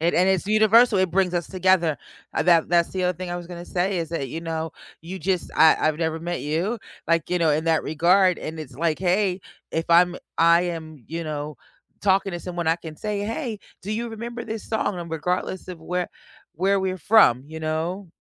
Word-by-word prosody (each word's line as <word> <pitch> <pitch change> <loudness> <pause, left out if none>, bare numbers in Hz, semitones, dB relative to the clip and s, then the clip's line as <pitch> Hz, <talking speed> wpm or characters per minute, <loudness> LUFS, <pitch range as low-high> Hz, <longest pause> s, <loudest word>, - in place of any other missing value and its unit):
And 170 +2 +1
and 185 +2 +4
it's 190 -1 +1
universal, 215 +1 +5
it 185 -1 +2
brings 185 0 +1
us 175 -2 -1
together. 185 -4 +2 0.4
Uh, - - 0
that 170 -2 +4
that's 170 -1 +3
the 185 -1 -2
other 180 -1 0
thing 180 0 -5
I 175 - -2
was 175 -1 -7
gonna 175 0 -8
say, 185 +2 -1
is 165 -2 -3
that, 150 -5 -3
you 160 +6 -5
know, 160 -1 -3 0.3
you 180 +4 -7
just 185 +1 -1
I 160 - +6
I've 155 -1 +1
never 160 -1 -1
met 175 +1 -4
you, 170 +10 -1 0.3
like, 165 0 +1
you 180 - +2
know, 165 -2 +3
in 150 +2 +1
that 165 -2 +2
regard, 180 +4 +3
and 160 +1 -6
it's 135 -4 -9
like, 160 +2 0
"Hey," 190 +1 +1 0.3
if 165 - -1
I'm 175 +1 +5 0.2
I 170 +1 +5
am, 160 -6 -6
you 165 +1 -4
know, 150 -1 -5 0.4
talking 195 -1 +2
to 175 - -4
someone, 175 -2 -4
I 165 +1 +3
can 160 -2 -10
say, 210 +3 -3
"Hey, 225 +2 -3 0.2
do 200 - -6
you 235 +2 -2
remember 235 +1 -6
this 220 -1 -5
song?" 215 -4 -1
And 170 -1 -7
regardless 180 +4 -2
of 180 -3 -7
where 180 +2 -2 0.5
where 195 +4 +2
we're 185 0 -2
from, 165 - +5
you 160 +1 -8
know? 165 +5 -3
175 Hz, 215 wpm, -24 LUFS, 160-190 Hz, 0.5 s, I